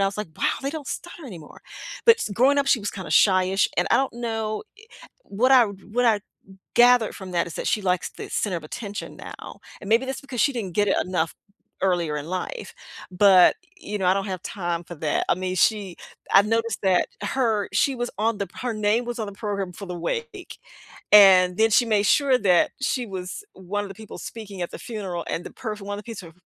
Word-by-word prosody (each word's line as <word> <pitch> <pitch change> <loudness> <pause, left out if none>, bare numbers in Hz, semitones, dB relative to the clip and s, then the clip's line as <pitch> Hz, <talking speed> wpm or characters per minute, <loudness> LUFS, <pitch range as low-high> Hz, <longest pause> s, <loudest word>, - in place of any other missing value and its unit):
I 195 - +3
was, 195 - -4
like, 210 -5 -4
"Wow, - - +1
they 275 - -2
don't 305 -2 -7
stutter 345 -4 -7
anymore." 170 -9 -11 0.5
But 460 - +8
s 215 - -3
growing 265 +6 +3
up, 280 - +1
she 260 -4 +3
was 205 - -3
kinda 185 -6 -8
shy-ish. 185 +1 +4
And - - +2
I - - +5
don't 270 -3 0
know 225 -2 -3 0.2
e - - -16 0.4
what 245 +7 +1
I 250 -3 +7
what 205 +4 -3
I 215 -3 +3 0.5
gathered 240 -2 +5
from 190 -2 -9
that, 170 -1 +1
is 170 - -9
that - - -5
she 210 - 0
likes 180 -2 0
the - - -9
center 190 -5 -1
of 165 - -6
attention 205 +6 -7
now, - - -10 0.2
and 195 - -9
maybe 230 +4 +3
that's 265 - -4
because 255 -4 -5
she 280 - +3
didn't 215 -8 -4
get 205 - +2
it - - +2
enough 175 -3 -1 0.5
earlier 175 -5 +1
in 145 - -5
life, 185 - -5 0.4
but, 185 -1 +6 0.2
you 210 0 -5
know, 185 - -1
I 185 - +4
don't 195 +1 -2
have 185 -2 -4
time 175 -3 -4
for 175 - -9
that. 155 -1 -1
I - - +5
mean, 185 +1 -3
she 200 -3 +1 0.4
I've 200 +1 +6
noticed 225 0 0
that 185 -2 +2
her 220 -2 0
she 275 - +2
was 240 0 -3
on 220 0 0
the 200 - -3
her 245 -1 -1
name 215 +3 +1
was 240 0 -4
on 220 - -3
the 200 - -7
program 200 -3 -4
for 200 +3 -9
the 180 -1 -6
wake, 410 - -5 0.5
and 185 -3 +8
then 225 0 +4
she 240 +4 +5
made 210 -2 +2
sure 270 -1 +4
that 180 -4 +3
she 260 -1 -1
was 185 - -6
one 195 +2 -4
of - - -7
the - - -8
people 220 +2 -11
speaking 205 -5 -7
at 175 - -4
the - - -7
funeral 195 -7 -5
and 170 - -3
the - - -8
perf 215 -3 -6
one 205 +1 -5
of 210 - -10
piece 225 -4 -8
of 165 -2 -13
205 Hz, 230 wpm, -24 LUFS, 185-235 Hz, 0.5 s, But